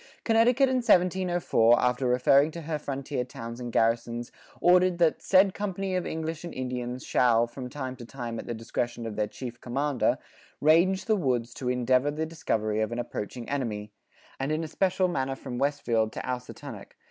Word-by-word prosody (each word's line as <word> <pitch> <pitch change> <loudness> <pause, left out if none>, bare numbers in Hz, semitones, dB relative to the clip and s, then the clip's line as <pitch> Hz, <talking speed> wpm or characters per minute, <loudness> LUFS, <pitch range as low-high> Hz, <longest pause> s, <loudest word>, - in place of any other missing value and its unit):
"[45:1] - - -48
Connecticut 240 +4 +4
in 260 - +1
1704 180 - +3
after 125 +1 +1
referring 135 +4 +4
to 170 +1 -7
her 155 0 -3
frontier 140 -2 -3
towns 115 -1 -8
and 120 -1 -5
garrisons 115 +1 0 0.3
ordered 180 0 +4
that 170 -2 +2
"said 190 0 +4
company 195 -2 -3
of 180 - -1
English 160 0 -4
and 170 - -7
Indians 125 -1 -4
shall, 120 -2 +3
from 125 +2 -8
time 130 -2 -5
to 120 - -9
time 120 -2 -6
at - - -8
the 120 - -3
discretion 120 +1 -3
of 110 -2 -5
their 105 -1 0
chief 120 +2 -8
co[=m]ander, 135 +2 0 0.4
range 170 +5 +4
the 220 - +3
woods 125 - -1
to 130 - -7
indevour 125 +2 +2
the 155 +2 -2
discovery 110 -10 -1
of 110 - -1
an 120 - -3
approaching 120 0 -5
enemy, 110 -7 -3 0.5
and 135 +2 -1
in 155 +1 0
especiall 185 +3 +1
manner 135 -6 -1
from 125 -2 -6
Westfield 125 -6 +1
to - - -5
Ousatunnuck. 125 -1 -6
130 Hz, 180 wpm, -27 LUFS, 120-170 Hz, 0.5 s, Connecticut